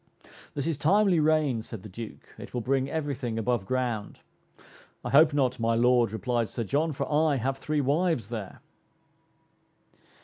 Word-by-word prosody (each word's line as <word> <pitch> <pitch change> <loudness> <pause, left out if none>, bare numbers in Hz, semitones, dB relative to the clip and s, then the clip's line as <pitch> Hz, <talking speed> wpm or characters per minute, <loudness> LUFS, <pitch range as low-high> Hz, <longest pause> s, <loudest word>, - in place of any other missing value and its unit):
"This 140 - -2
is 160 -3 -2
timely 190 +2 +4
rain," 150 -6 +2
said 110 -3 -9
the - - -8
Duke, 110 +4 -9
"it - - -9
will 120 - -1
bring 135 +2 0
every 145 -2 -2
thing 120 -3 -4
above 115 -3 -1
ground." 120 -4 -2 0.9
"I - - -3
hope 155 +3 +6
not, 130 -3 0
my 115 0 +1
Lord," 120 -1 +3
replied 115 +1 -1
Sir 115 - -3
John, 150 +9 0
"for 140 - -3
I 150 0 +2
have 135 +2 -2
three 150 +1 -1
wives 145 - 0
there." 110 -5 -6
130 Hz, 165 wpm, -27 LUFS, 115-150 Hz, 0.9 s, hope